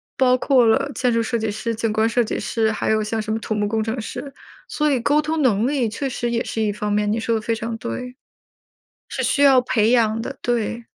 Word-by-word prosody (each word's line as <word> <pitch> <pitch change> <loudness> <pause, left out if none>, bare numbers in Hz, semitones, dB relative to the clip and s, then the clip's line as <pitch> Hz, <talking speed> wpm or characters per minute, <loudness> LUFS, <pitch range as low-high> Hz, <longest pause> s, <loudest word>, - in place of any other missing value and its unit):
包 255 -1 +3
括 255 -2 +3
了 265 +5 +2
建 250 -1 +1
筑 230 0 +2
设 230 +1 -1
计 220 -1 -2
师、 230 +2 -3
景 225 0 -1
观 220 +1 +2
设 235 +1 +2
计 - - -3
师， 220 -1 0
还 - - -2
有 215 0 +2
像 220 +1 -2
什 215 0 -3
么 - - 0
土 220 - -3
木 210 -1 0
工 220 +1 -1
程 225 +2 -3
师， 260 +5 -7 0.4
所 300 0 0
以 265 -4 +1
沟 290 +5 +3
通 315 +1 -2
能 230 -4 +2
力 265 -5 0
确 270 +6 -3
实 240 -1 -3
也 235 0 0
是 225 - -3
一 210 -1 +1
方 210 0 -3
面， 210 0 +1
你 225 - 0
说 225 0 0
得 220 - -1
非 230 +2 -1
常 225 +1 -4
对。 250 - -6 1.0
是 260 - -1
需 260 +3 +1
要 265 -3 +6
培 225 -2 +1
养 225 -2 +2
的， 270 -1 -6
对。 235 -1 -2
230 Hz, 270 characters per minute, -21 LUFS, 220-255 Hz, 1.0 s, 要